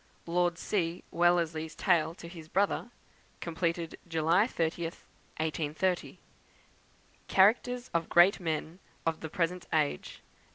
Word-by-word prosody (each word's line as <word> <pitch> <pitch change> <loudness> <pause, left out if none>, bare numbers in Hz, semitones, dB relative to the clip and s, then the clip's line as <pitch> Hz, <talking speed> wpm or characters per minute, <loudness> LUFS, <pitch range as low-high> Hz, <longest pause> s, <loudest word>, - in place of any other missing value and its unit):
Lord 175 0 +1
C. 175 -4 -1
Wellesley's 170 -2 +1
Tale 170 -3 +2
to 170 - -10
his 165 -2 -10
Brother; 200 +6 0 0.5
completed 170 0 -2
July 165 +5 +3
30th, 165 -4 -3 0.3
1830. 160 +3 -1 1.1
Characters 240 +5 +3
of 170 -1 0
Great 175 +4 +6
Men 160 0 -3 0.3
of 165 -1 0
the 160 - -6
Present 180 0 -1
Age, 150 - -1
Dec. - - -33
170 Hz, 115 wpm, -30 LUFS, 160-180 Hz, 1.1 s, Great